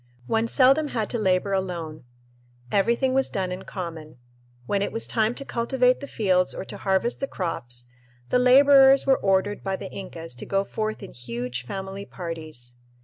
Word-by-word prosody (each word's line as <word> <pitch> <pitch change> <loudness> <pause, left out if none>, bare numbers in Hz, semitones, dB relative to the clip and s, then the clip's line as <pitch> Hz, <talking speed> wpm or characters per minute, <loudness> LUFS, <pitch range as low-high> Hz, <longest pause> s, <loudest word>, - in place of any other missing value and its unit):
One 225 - +1
seldom 270 +5 +4
had 225 -6 -2
to 240 - -1
labor 190 -1 +1
alone. 170 -7 -3 0.7
Everything 235 +6 +2
was 270 0 +2
done 185 -2 -2
in 185 +1 -6
common. 165 -6 -7 0.5
When 200 +9 0
it 200 - -1
was 225 - -1
time 225 +1 +1
to 275 - -6
cultivate 250 +1 +1
the 280 - -7
fields 185 -6 +1
or - - -5
to - - -8
harvest 195 +4 +1
the 275 - -2
crops, 120 - -4 0.4
the 250 - +3
laborers 270 +1 +7
were 270 -1 +4
ordered 195 +1 +1
by 195 -1 -1
the 190 - -8
Incas 165 -6 -8
to - - -6
go 195 0 +1
forth 215 +1 -4
in 195 - -9
huge 125 +1 -5
family 195 +2 -6
parties. 155 -8 -7
195 Hz, 175 wpm, -25 LUFS, 170-235 Hz, 0.7 s, laborers